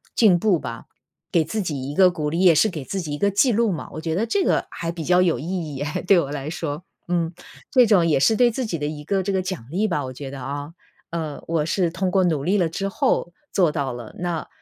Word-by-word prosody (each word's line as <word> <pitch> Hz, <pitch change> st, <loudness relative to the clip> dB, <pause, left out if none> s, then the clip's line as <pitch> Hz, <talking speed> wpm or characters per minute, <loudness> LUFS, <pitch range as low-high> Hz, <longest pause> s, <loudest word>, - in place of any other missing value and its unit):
进 195 Hz, -7 st, +5 dB
步 190 Hz, -3 st, +2 dB
吧。 115 Hz, -4 st, -7 dB, 0.5 s
给 170 Hz, -, +3 dB
自 210 Hz, +8 st, -3 dB
己 140 Hz, -7 st, -3 dB
一 -, -, -4 dB
个 185 Hz, +1 st, +6 dB
鼓 155 Hz, -4 st, -2 dB
励， 165 Hz, +3 st, -2 dB
也 180 Hz, -3 st, +6 dB
是 190 Hz, +8 st, +4 dB
给 155 Hz, -8 st, -6 dB
自 195 Hz, +5 st, -3 dB
己 155 Hz, -4 st, -6 dB
一 145 Hz, -, -2 dB
个 200 Hz, -, +2 dB
记 200 Hz, +6 st, +3 dB
录 230 Hz, 0 st, +2 dB
嘛。 170 Hz, -6 st, -4 dB
我 -, -, -6 dB
觉 160 Hz, 0 st, -2 dB
得 210 Hz, +6 st, +1 dB
这 380 Hz, -, +1 dB
个 -, -, +2 dB
还 165 Hz, -, -4 dB
比 170 Hz, -1 st, -4 dB
较 180 Hz, +3 st, +4 dB
有 170 Hz, -7 st, +2 dB
意 135 Hz, -, -7 dB, 0.3 s
义 135 Hz, -, -3 dB
诶， 150 Hz, +1 st, -3 dB
对 190 Hz, +1 st, +5 dB
我 140 Hz, -5 st, 0 dB
来 145 Hz, 0 st, -4 dB
说。 160 Hz, 0 st, -4 dB, 0.2 s
嗯。 170 Hz, -1 st, 0 dB, 0.4 s
这 255 Hz, -3 st, +6 dB
种 195 Hz, -6 st, +4 dB
也 150 Hz, -4 st, +2 dB
是 220 Hz, +8 st, +4 dB
对 245 Hz, -1 st, +5 dB
自 250 Hz, +2 st, -3 dB
己 180 Hz, -7 st, -2 dB
的 145 Hz, -, -3 dB
一 150 Hz, 0 st, -5 dB
个 195 Hz, +5 st, 0 dB
这 195 Hz, +1 st, -2 dB
个 190 Hz, -, +1 dB
奖 185 Hz, -9 st, -5 dB
励 190 Hz, +8 st, 0 dB
吧， 150 Hz, -9 st, -1 dB
我 130 Hz, -, -6 dB
觉 135 Hz, +1 st, -7 dB
得 140 Hz, -, -7 dB
啊。 145 Hz, +3 st, -5 dB, 0.4 s
嗯， 160 Hz, -3 st, -4 dB
我 160 Hz, -2 st, 0 dB
是 175 Hz, +1 st, +1 dB
通 185 Hz, +2 st, -1 dB
过 190 Hz, +1 st, +3 dB
努 155 Hz, -6 st, 0 dB
力 195 Hz, +4 st, +2 dB
了 175 Hz, -4 st, +2 dB
之 195 Hz, +4 st, -3 dB
后 195 Hz, -4 st, 0 dB, 0.2 s
做 180 Hz, -4 st, +3 dB
到 140 Hz, -4 st, -1 dB
了。 120 Hz, -2 st, -9 dB
那， 175 Hz, -2 st, -3 dB
170 Hz, 285 characters per minute, -23 LUFS, 150-190 Hz, 0.5 s, 个